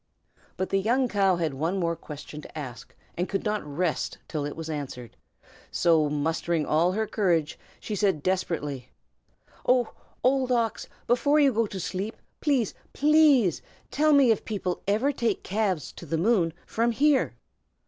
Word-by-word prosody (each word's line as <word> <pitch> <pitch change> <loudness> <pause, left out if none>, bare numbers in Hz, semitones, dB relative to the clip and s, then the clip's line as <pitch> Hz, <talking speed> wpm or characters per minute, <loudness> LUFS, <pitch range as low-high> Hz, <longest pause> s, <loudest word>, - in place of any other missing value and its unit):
But 190 - -2
the 195 - +2
young 245 +6 +2
cow 195 -4 +2
had 165 -4 -1
one 165 +8 -1
more 170 -2 0
question 150 -1 -9
to 155 - -11
ask, 130 -2 -8 0.2
and 180 +2 -2
could 195 - -2
not 210 0 -1
rest 155 +3 -2
till 150 -3 -3
it 145 - -5
was 160 0 -6
answered; 140 -6 -6 0.5
so 160 -3 +3
mustering 160 +2 0
all 170 +4 +2
her 220 +2 0
courage, 175 -8 0 0.2
she 215 - -4
said, 190 -7 +1
desperately, 150 -8 -2 0.7
"Oh, 250 -2 +2 0.3
Old 260 0 +2
Ox! 230 -3 0 0.2
before 285 +5 +3
you 280 -3 +4
go 225 0 +1
to 195 - -6
sleep, 190 +4 -3 0.2
please 270 - +1 0.2
please, 290 - +4 0.3
tell 305 +2 +3
me 275 -5 +6
if 220 - 0
people 190 -5 -3
ever 220 +8 +2
take 235 -6 -1
calves 195 -6 -1
to 170 - -11
the 160 - -1
moon 180 -2 +2
from 235 +1 0
here?" 285 +2 +2
190 Hz, 160 wpm, -26 LUFS, 160-235 Hz, 0.7 s, me